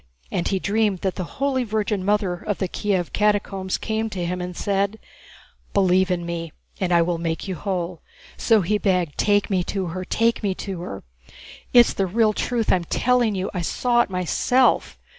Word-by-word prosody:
And 175 - -1
he 195 - +1
dreamed 205 -1 0
that 190 -2 0
the 185 - -4
Holy 270 -2 +1
Virgin 210 -3 -1
Mother 205 -2 +1
of 190 +3 -3
the 190 - -1
Kiev 185 -2 -1
catacombs 200 -2 0
came 220 0 -2
to 185 -4 -3
him 180 +1 -2
and 180 0 -6
said, 200 +1 0 0.8
'Believe 190 -1 +3
in 175 -1 -1
me 165 -2 -4 0.3
and 185 -2 -1
I 170 -1 +5
will 170 0 -1
make 165 +2 -3
you 190 - -2
whole.' 180 -1 -3 0.3
So 225 -3 +3
he 205 +4 0
begged: 180 -7 +1
'Take 205 -1 +2
me 185 -2 +2
to 195 -2 -2
her, 185 0 -4
take 230 +5 +1
me 200 -3 -1
to 190 -3 -5
her.' 100 - -7 0.7
It's 240 -1 +6
the 195 - 0
real 215 +3 +2
truth 235 0 0
I'm 175 -2 0
telling 240 +1 +2
you, 190 0 -2
I 180 - -2
saw 240 +7 +2
it - - -1
myself. 190 +8 +2
195 Hz, 190 wpm, -23 LUFS, 180-215 Hz, 0.8 s, It's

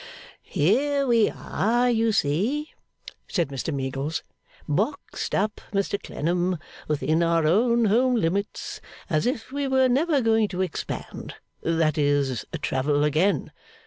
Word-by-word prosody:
'Here 275 - +1
we 230 -4 +4
are, 240 +4 0
you 225 -2 +2
see,' 215 - 0 0.6
said 170 -8 0
Mr 140 +3 -3
Meagles, 135 +2 -3 0.4
'boxed 210 - -2
up, 210 +2 -1
Mr 200 0 0
Clennam, 175 +3 -1 0.3
within 155 +2 +1
our 165 -1 +2
own 235 +8 +3
home 245 +5 +3
limits, 200 0 -2 0.3
as 155 +8 +2
if 245 -1 -3
we 280 0 -2
were 265 -1 +4
never 285 +4 +2
going 225 -3 +3
to 185 -2 -3
expand 185 -3 -5 0.3
that 160 -2 +1
is, 145 -4 +1 0.2
travel 145 +2 +1
again. 155 +2 +1
195 Hz, 125 wpm, -25 LUFS, 155-240 Hz, 0.6 s, we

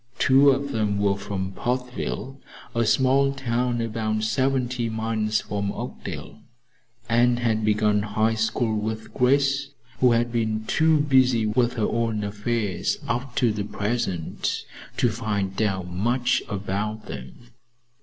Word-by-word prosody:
Two 135 +2 +6
of 140 +1 +1
them 105 -4 0
were 100 -1 +2
from 95 -1 -4
Portville, 125 +3 -3 0.4
a 115 -1 +1
small 135 +3 +3
town 125 -2 -1
about 110 -1 -1
seventy 125 +1 0
miles 110 -1 0
from 100 0 -3
Oakdale, - - -7 0.7
and 120 +1 +3
had 115 -2 0
begun 105 -1 +2
High 110 +2 +1
School 110 +1 0
with 110 +1 -4
Grace, 135 +1 +2 0.3
who 125 -2 +5
had 120 +1 +1
been 110 -2 -1
too 160 +4 +3
busy 130 -5 +3
with 120 +3 +1
her 110 -3 0
own 115 -2 -1
affairs 105 -1 -1
up 125 +2 -2
to 120 -3 +3
the 105 -1 -2
present 100 -5 -2 0.3
to 120 - +3
find 105 -3 -2
out 95 -4 0
much 120 +7 +1
about 105 +2 -3
them. 70 - -9
115 Hz, 135 wpm, -24 LUFS, 105-125 Hz, 0.7 s, Two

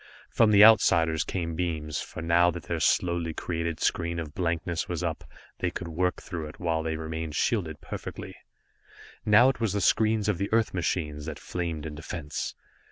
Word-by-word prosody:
From 115 - +4
the 105 -1 +7
outsiders 80 -7 +5
came 85 -3 -3
beams, 80 -4 -2
for 80 - -7
now 85 +1 +4
that 85 -1 -5
their 85 -1 -3
slowly 85 -1 +1
created 85 -1 -3
screen 85 -3 0
of 80 -3 -5
blankness 85 -1 -2
was 85 -1 -3
up, 80 -3 -3 0.4
they 90 - 0
could 85 0 -6
work 90 +3 0
through 80 -3 -5
it, 75 - -12
while 80 -2 0
they 80 0 -2
remained 80 -1 -5
shielded 85 -9 0
perfectly. - - -7 0.9
Now 105 +4 +7
it 135 - -2
was 115 -4 0
the 100 - 0
screens 110 +1 +2
of 100 -5 0
the 100 - -2
Earth 115 0 +2
machines 75 -4 -2
that 80 - -5
flamed 85 -4 -4
in 75 - -5
defense. 75 -1 -5
85 Hz, 180 wpm, -27 LUFS, 80-90 Hz, 0.9 s, the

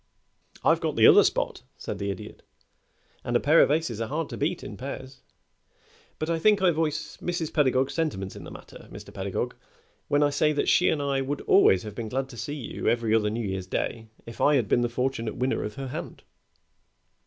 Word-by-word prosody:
"I've - - +4
got - - -1
the - - +5
other - - +8
spot," - - -1 0.2
said 100 - -6
the 100 0 -2
Idiot, 100 - -7 0.8
"and 120 - -2
a - - +5
pair 155 +4 +5
of - - +4
aces 145 -7 0
are 115 - -2
hard 155 +3 -3
to - - -6
beat 165 +5 -1
in 105 - -7
pairs; 130 +2 -8 1.0
but 155 - -3
I 165 -1 0
think 210 +4 +4
I 185 -2 +4
voice 155 -1 -2
Mrs. 170 -3 -3
Pedagog's 135 -3 +2
sentiments 120 - -2
in - - -9
the - - -9
matter, - - -13
Mr. - - -11
Pedagog, - - -3 0.5
when 145 +1 +3
I 145 - +2
say 150 +1 +2
that 145 - -1
she 180 - +4
and 145 -2 0
I 140 -1 0
would 140 +2 -3
always 95 - +4
have 105 -1 -7
been 110 0 -5
glad 135 +3 -2
to 120 - -11
see 145 +6 -4
you 130 -7 -5
every 115 -2 +1
other 105 -2 +3
New 110 0 -3
Year's 95 -1 -4
day 110 +3 -3 0.2
if 115 - -9
I 150 - +5
had 120 -6 +1
been 120 - +2
the 120 - 0
fortunate 120 -2 -2
winner 130 +1 -1
of 105 0 -5
her 135 -1 -5
hand." - - -7
135 Hz, 215 wpm, -26 LUFS, 115-150 Hz, 1.0 s, other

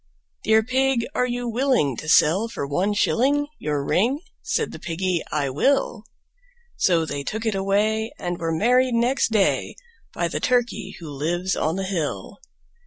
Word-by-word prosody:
III. - - -45
"Dear 220 0 +5
Pig, 260 0 +1
are 250 - +1
you 245 0 -3
willing 235 - +1
to 155 - -5
sell 185 +9 +4
for 225 -10 -4
one 185 +9 0
shilling 280 +7 +2
Your 145 -2 -2
ring?" 235 - +2 0.2
Said - - -1
the - - -9
Piggy, 175 0 -1
"I 140 -3 0
will." 230 - +1 0.7
So 170 -3 +2
they 145 -2 -4
took 220 +10 -4
it 220 - +1
away, 210 +3 0
and 175 0 -4
were 165 0 -1
married 245 +8 +3
next 240 +1 +1
day 210 -3 +1 0.4
By - - -1
the - - -3
Turkey 230 -6 0
who 165 - -9
lives 170 +6 -2
on 155 +2 0
the 195 - -2
hill. 175 -6 -3
200 Hz, 170 wpm, -23 LUFS, 165-240 Hz, 0.7 s, Dear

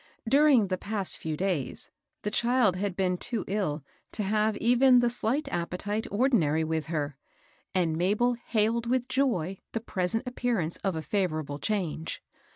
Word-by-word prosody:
During 270 -5 +5
the 185 -1 -1
past 200 -3 -2
few 155 -1 -3
days 180 -7 -1 0.3
the 210 - -2
child 235 -4 +3
had 195 0 -2
been 180 -2 0
too 230 -4 -3
ill 180 -8 -1 0.3
to 215 - -2
have 215 +2 +1
even 250 +2 +5
the 240 -1 +3
slight 250 +4 0
appe 175 +1 -3
tite 205 +3 -2
ordinary 200 - +2
with 160 -1 -2
her, 145 -4 -3 0.6
and 170 -4 +2
Mabel 210 +9 +2
hailed 230 0 0
with 250 0 +1
joy 230 - 0
the 225 - 0
present 220 +3 -2
appearance 235 -10 -1
of 195 -3 -2
a 160 - -3
favorable 155 -8 -1
change. 175 -6 -2
205 Hz, 160 wpm, -28 LUFS, 170-235 Hz, 0.6 s, During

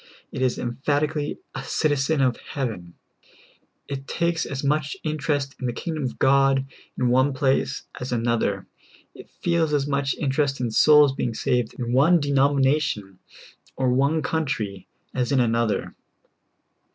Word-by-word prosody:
It - - -5
is 130 -2 +1
emphatically 145 +5 -1 0.2
a 135 - -5
citizen 145 0 +1
of 125 -3 +2
heaven; 110 - -5 0.9
it 135 -1 -6
takes 170 -1 -1
as 140 0 -5
much 150 +4 0
interest 145 -3 -1
in 130 - -2
the 120 - -2
kingdom 160 +4 -4
of 125 - -4
God 135 0 +3 0.3
in 125 -1 +1
one 130 +3 +3
place 135 +1 0 0.2
as 125 +1 -5
another; 115 -5 0 0.5
it - - -13
feels 165 -3 0
as 140 -1 +1
much 140 -1 0
interest 140 -1 0
in 120 -2 -1
souls 150 +3 +6
being 120 -4 -2
saved 120 -1 0
in 120 -1 -3
one 155 +7 +5
denomination 140 - +1 0.6
or 130 -1 +1
one 140 +4 +2
country 110 - -2 0.3
as 125 +1 -1
in 135 - +3
another. 115 -2 0
135 Hz, 140 wpm, -24 LUFS, 125-145 Hz, 0.9 s, souls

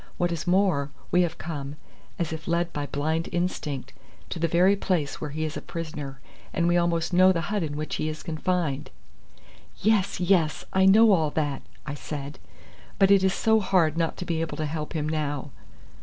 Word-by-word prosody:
What 175 0 +1
is 170 -1 -4
more, 180 -6 +2 0.2
we 180 - +5
have 175 -2 -1
come, 145 -3 -5 0.4
as 165 -2 -2
if 160 0 -7
led 170 0 0
by 145 -1 -3
blind 160 +4 -1
instinct, 165 -6 -2 0.4
to 170 - -3
the 165 - +2
very 180 +4 +4
place 175 -7 -1
where 150 - -3
he 155 +2 -3
is 155 - -4
a - - -4
prisoner, 150 -5 -6 0.3
and 170 0 +1
we 175 - +3
almost 170 0 +1
know 185 +1 +7
the 175 - 0
hut 205 - +1
in 150 -3 -3
which 155 0 -3
he 155 - -1
is 155 - -6
confined." 165 -3 -1 0.9
"Yes, 205 -3 +2
yes. 175 -4 +2
I 190 0 +5
know 220 +3 +7
all 160 -6 +3
that," 145 -2 -2 0.2
I 145 - -4
said; 145 -1 -6 0.6
"but 195 0 +5
it 195 -1 +6
is 190 0 +2
so 220 0 +3
hard 180 -6 +2
not 165 -1 -1
to 180 - -5
be 165 -2 -1
able 165 - -3
to 155 - -1
help 150 +1 -4
him 155 -2 -1
now." 145 -2 -2
165 Hz, 200 wpm, -26 LUFS, 150-180 Hz, 0.9 s, know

